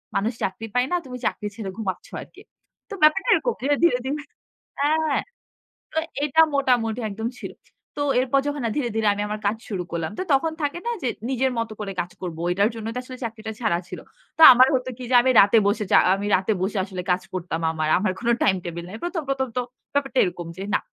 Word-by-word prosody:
মানুষ 200 +4 +1
চাকরি 195 +4 -3
পায় 250 +1 +2
না, - - +2
তুমি 250 -1 -7
চাকরি 210 - -1
ছেড়ে 215 -4 -5
ঘুমাচ্ছ 195 -5 -4
আরকি।" - - -14 0.5
তো - - -7
ব্যাপারটা 345 +9 +4
এরকম 480 - +1
ধীরে, 285 +3 +2
ধীরে 340 -8 +5
ধি - - -2 0.7
হ্যাঁ, 305 0 +2 0.7
তো 320 - -1 0.3
এটা 295 +2 +3
মোটামুটি 245 -4 +1
একদম 220 +3 -3
ছিল। - - -7 0.4
তো 290 - -1 0.2
এরপর 265 +2 +2
যখন 290 0 -2 0.2
ধীরে, 275 -5 0
ধীরে 220 -1 +2
আমি 205 - -3
আমার 210 0 -4
কাজ 205 +2 +1
শুরু 195 -6 -3
করলাম। 165 -2 -2
তো - - -1
তখন 315 +4 +2
থাকে 290 +3 -1
না - - +1
যে 255 - 0 0.2
নিজের 260 0 +1
মতো 230 -1 -2
করে 200 -2 -4
কাজ 175 - -4
করব। 170 -3 -5
এটার 200 +3 +3
জন্যই 225 0 -5
তো - - -3
আসলে 255 0 -9
চাকরিটা 220 -1 -5
ছাড়া 175 -8 +1
ছিল। - - -7 0.4
তো - - +4
আমার 255 +1 +6
হতো 255 0 0
কি 255 - -7
যে - - +2
আমি 260 - +3
রাতে 200 +3 +6
বসে 210 +1 +1
চা - - +8 0.2
আমি 200 +1 -3
রাতে 190 +4 0
বসে 200 +2 -1
আসলে 185 -2 -6
কাজ 180 +1 +2
করতাম 170 -2 -3
আমার। 155 -1 -2
আমার 190 0 0
কোনো 235 0 +1
টাইম 190 - +3
টেবল 170 0 -5
নাই। 195 - -7
১ম 345 -1 -2
১ম 270 -1 0
তো - - +2 0.3
ব্যাপারটা 275 -2 0
এরকম 175 -2 -4
যে 190 - -6
না। - - +3
230 Hz, 220 wpm, -23 LUFS, 195-270 Hz, 0.7 s, চা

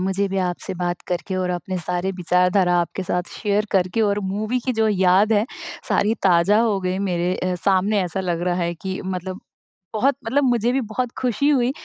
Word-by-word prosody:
मुझे 190 +2 0
भी 195 0 -2
आपसे 185 +1 -2
बात 175 0 -2
करके 180 +1 -3
और 185 -1 -1
अपने 180 +1 -3
सारे 180 +2 -2
विचारधारा 180 +1 +2
आपके 175 +3 -3
साथ 180 -1 -2
शेयर 210 0 0
करके 185 +3 +1
और 205 -2 +2
मूवी 215 +6 -1
की 255 - 0
जो 220 -1 +1
याद 190 +1 +3
है, 210 0 +3 0.4
सारी 215 +2 +2
ताज़ा 185 +3 +4
हो 220 -4 +2
गई। 185 0 -1
मेरे 180 -2 0
अ, 185 0 -1
सामने 195 +3 +2
ऐसा 180 +1 -3
लग 175 -3 -2
रहा 175 - +1
है 170 0 -1
कि 190 +2 -5
मतलब 185 0 -4 0.5
बहुत 255 +6 +2
मतलब 270 +6 +2
मुझे 240 -2 +2
भी 270 - +1
बहुत 235 +2 -3
खुशी 260 +3 +1
हुई 255 -3 +3
190 Hz, 200 wpm, -22 LUFS, 180-215 Hz, 0.5 s, ताज़ा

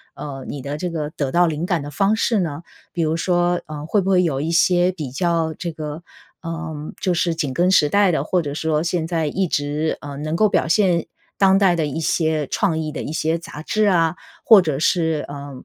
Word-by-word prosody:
呃， 135 -3 -7
你 140 - -5
的 140 +2 -4
这 180 +3 -3
个 155 -3 -3
得 140 -4 -3
到 175 0 +4
灵 160 +2 -2
感 175 -5 0
的 145 - -6
方 195 +8 +1
式 225 -2 +1
呢？ 160 -1 -4 0.3
比 170 - -3
如 160 0 +1
说， 175 0 +1
呃， 150 -1 -7
会 200 +4 +1
不 190 - -2
会 185 -1 +4
有 145 -6 0
一 165 +2 -2
些 175 +2 +3
比 150 -8 -6
较 165 +1 0
这 170 -2 -4
个， 155 +1 -7 0.4
呃， 165 -1 -5 0.3
就 180 - 0
是 170 0 +1
紧 145 -5 -2
跟 180 +6 +2
时 150 -5 +5
代 200 +1 +3
的， 150 -2 -1
或 180 0 +1
者 145 -2 -5
说 155 0 0
现 170 -1 -1
在 165 -3 -1
一 185 +4 -1
直， 150 +2 -1
呃， 145 -1 -7
能 155 +2 -3
够 215 +3 +3
表 - - +1
现 175 -2 +2 0.3
当 195 -1 +5
代 190 -3 +4
的 160 -2 0
一 145 +2 -4
些 155 -3 0
创 175 -6 0
意 155 -1 -3
的 - - -5
一 150 - -5
些 160 +1 0
杂 155 -2 -9
志 215 +3 +1
啊？ 170 -4 +2 0.3
或 215 -4 +8
者 155 -5 -2
是， 160 -1 +1
呃， 145 0 -7
165 Hz, 245 characters per minute, -21 LUFS, 150-175 Hz, 0.4 s, 或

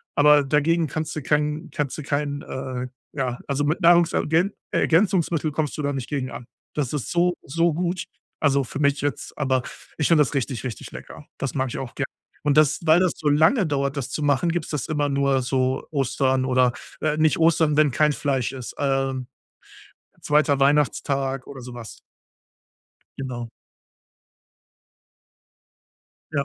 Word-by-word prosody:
aber 145 0 +6
dagegen 155 +3 +2
kannst 155 +3 -4
du 155 - -3
kein 150 +1 0
kannst 145 -3 -3
du 155 - -6
kein 145 0 -2
äh, 130 -1 -5 0.3
ja, 130 -4 -2
also, 140 +1 0
mit 155 +6 0
Nahrungsergän 170 +1 +4 0.2
Ergänzungsmittel 165 -3 +2
kommst 150 -1 -2
du - - -2
da 145 0 -1
nicht 130 -3 -5
gegen 135 -3 -2
an. 120 - -8 0.3
Das 145 -2 -1
ist 145 - -3
so, 175 +1 +2
so 165 +3 +1
gut, 175 +2 -2 0.4
also 140 -2 +2
für 130 - -7
mich 140 -1 +2
jetzt, 145 -2 -3
aber 130 -3 +1 0.3
ich 150 - +1
finde 160 -3 +5
das 145 - -5
richtig, 130 -4 -2
richtig 120 -5 -6
lecker. - - -10
Das 135 +1 -3
mag 130 -1 0
ich - - -5
auch 130 -3 -7
gern, - - -1 0.4
und 145 -1 +2
das 155 -1 +5
weil 160 +2 +6
das 185 -2 +2
so 150 - 0
lange 160 - +4
dauert, 140 -1 -1
das 130 -1 -4
zu 155 - -3
machen, 145 +4 +2
gibt's 170 -2 -3
das 150 -3 -2
immer 145 -2 0
nur 140 -1 +2
so 130 +1 -1
Ostern 130 -2 +1
oder, 125 -1 +3 0.3
äh, 155 0 0
nicht 155 0 +3
Ostern, 160 -2 +3
wenn 155 -2 +5
kein 150 +4 +3
Fleisch 135 -4 -1
ist, 130 -3 -7
äh, 135 -1 0 1.1
2. 150 -1 +3
Weihnachtstag 135 -1 +1
oder 135 -2 -9
sowas. 120 -2 -9 1.2
Genau. 120 -3 -5 2.8
Ja. 140 -2 0
145 Hz, 165 wpm, -23 LUFS, 135-155 Hz, 2.8 s, aber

